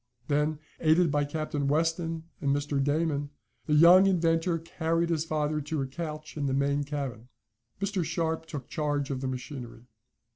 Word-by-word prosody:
Then, 150 +1 +1 0.2
aided 160 +1 +4
by 145 0 +2
Captain 145 -1 -2
Weston 165 +2 0 0.2
and 140 - 0
Mr. 145 0 +1
Damon, 145 0 0 0.4
the 150 - +3
young 175 +5 +8
inventor 165 -2 +2
carried 165 +1 -1
his 165 -2 0
father 155 -1 -1
to 150 +1 -2
a - - -2
couch 155 +2 -6
in 145 -2 -1
the 135 - 0
main 140 +1 +1
cabin. 140 -5 -5 0.5
Mr. 200 -2 -1
Sharp 160 0 -2
took 145 -5 -6
charge 145 -2 -1
of 130 -1 -3
the 135 - -2
machinery. 125 -2 -6
150 Hz, 160 wpm, -28 LUFS, 140-165 Hz, 0.5 s, young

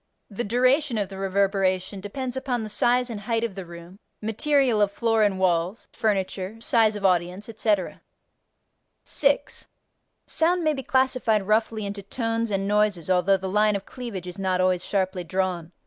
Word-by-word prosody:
The 205 +4 -3
duration 255 +4 +2
of 200 -3 -1
the 195 -1 -8
reverberation 195 0 0
depends 250 +5 -5
upon 255 -3 -2
the 215 - -6
size 245 +3 +2
and 215 - -5
height 225 +2 -1
of 230 -4 -2
the 190 -2 -8
room, 170 +3 -12 0.2
material 235 +1 +1
of 205 -1 +3
floor 225 +1 +1
and 205 -3 +2
walls, 180 +2 0
furniture, 200 -1 -2
size 225 -2 +2
of 200 -1 -3
audience, 180 +2 +1
etc. 215 -4 -1 1.0
6. 285 0 0 0.6
Sound 345 +2 +1
may 310 -1 +2
be 270 - -4
classified 255 -5 +1
roughly 215 0 +1
into 200 0 -5
tones 225 +2 -2
and 195 -1 -1
noises 205 -4 +1
although 185 +2 +3
the 190 0 -5
line 210 +2 +2
of 200 - -4
cleavage 235 -8 -7
is 180 +2 -8
not 185 -1 0
always 185 -1 +2
sharply 185 -2 -1
drawn. 180 -2 -2
205 Hz, 165 wpm, -25 LUFS, 190-230 Hz, 1.0 s, of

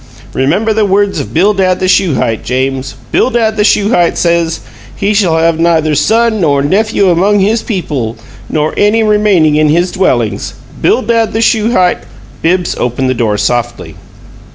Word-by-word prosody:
Remember 185 +12 0
the 215 0 +1
words 200 0 0
of - - -6
Bildad 185 +1 +1
the 185 - -1
Shuhite, 150 - 0
James. 130 +1 -3 0.2
Bildad 230 -3 +1
the 210 - +1
Shuhite 205 -4 +1
says, 170 -1 0 0.3
'He 205 +1 -1
shall 185 -6 +1
have 165 0 +1
neither 165 -2 +1
son 225 - +1
nor 140 -4 +1
nephew 200 +3 +1
among 195 +5 +2
his 215 +4 +1
people, 140 - -4 0.3
nor 155 0 -1
any 215 +2 +2
remaining 205 -8 +2
in 155 0 +2
his 175 +4 +1
dwellings.' 120 - -1 0.3
Bildad 230 0 +1
the 220 - -1
Shuhite 220 -5 +1 0.2
" - - -23
Bibbs 180 +1 0
opened 130 +2 -1
the - - +1
door 110 -4 -1
softly. 120 +3 -2
180 Hz, 155 wpm, -11 LUFS, 145-210 Hz, 0.3 s, among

